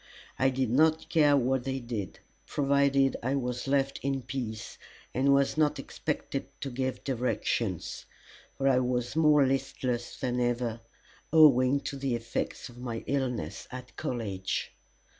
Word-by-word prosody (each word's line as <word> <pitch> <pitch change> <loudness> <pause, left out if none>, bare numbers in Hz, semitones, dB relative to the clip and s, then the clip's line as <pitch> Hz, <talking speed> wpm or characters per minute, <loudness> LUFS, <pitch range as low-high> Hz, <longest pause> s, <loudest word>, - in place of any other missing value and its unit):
I 130 +1 +4
did 130 -3 -1
not 155 +4 +3
care 145 -3 +5
what 130 0 +1
they 135 0 -2
did 115 -6 -5 0.3
provided 140 -1 +2
I 130 +4 0
was 125 -1 -2
left 135 0 +1
in 135 -1 -1
peace 115 -4 -5 0.3
and 135 +2 +3
was 140 +2 +3
not 150 -1 +3
expected - - -4
to 135 - -3
give 130 +1 -3
directions; 120 - -1 0.5
for 135 - +1
I 130 -2 +5
was 125 0 -1
more 150 -3 +5
listless 130 -2 -2
than 125 -1 -1
ever, 120 -1 -1 0.5
owing 140 -4 +6
to 140 - -5
the 135 -3 -1
effects 115 +2 -3
of 120 -1 -13
my 120 -2 -4
illness 125 - -2
at 125 0 -9
college. 100 -6 -3
130 Hz, 140 wpm, -29 LUFS, 120-140 Hz, 0.5 s, owing